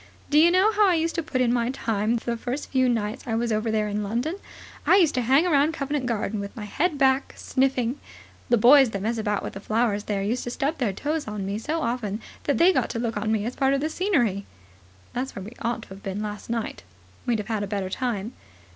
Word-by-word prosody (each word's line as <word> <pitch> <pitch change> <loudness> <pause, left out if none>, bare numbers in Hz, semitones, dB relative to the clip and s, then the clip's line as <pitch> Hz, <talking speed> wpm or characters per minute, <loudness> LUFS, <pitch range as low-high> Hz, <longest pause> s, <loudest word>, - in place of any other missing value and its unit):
Do 300 - +6
you 335 +2 +7
know 375 +5 +4
how 420 -1 +4
I 355 - +3
used 330 +1 0
to 335 - -1
put 295 -5 -2
in 240 -1 +3
my 240 -1 +1
time 225 -3 0
the 235 0 -2
first 245 +5 -5
few 260 -2 +3
nights 220 -2 -2
I 225 - 0
was 235 0 0
over 215 +1 0
here 215 -1 +1
in 210 0 -2
London? 240 - -2 0.5
I - - +5
used 345 -6 +4
to 255 - +1
hang 270 +7 +4
around 305 -2 +3
Covent 280 -3 -2
Garden 220 -2 -1
with 200 0 -6
my 220 - -6
head 300 - 0
back, 270 -1 +2
sniffing. 260 -1 0 0.5
The 240 - +5
boys 260 +3 +7
that 200 -3 -4
mess 225 +1 -1
about 210 -2 -1
with - - -5
the 195 - -7
flowers 215 0 0
there 200 -2 -1
used 235 +5 -1
to - - -3
stub 275 +6 -2
their 235 -6 +1
toes 295 +9 -3
on 210 -2 -4
me 200 +2 -2
so 315 +7 -2
often 220 -4 -2 0.3
that 285 -4 +1
they 360 +7 +6
got - - +1
to 230 - -3
look 230 -1 -2
on 215 +1 -1
me 215 -1 0
as 245 - -4
part 270 0 +2
of - - 0
the 310 +3 -2
scenery." 245 - 0 0.7
"That's 260 +2 -3
where 195 - -6
we 215 - -8
ought 235 -1 -2
to - - -16
have 190 +1 -10
been 200 +2 -4
last 210 +1 -6
night." 230 -1 -3 0.5
"We'd 240 -2 +2
have 210 -1 -5
had 220 -3 -1
a 205 - -2
better 195 -2 -3
time. 230 -2 -2
235 Hz, 250 wpm, -25 LUFS, 210-275 Hz, 0.7 s, you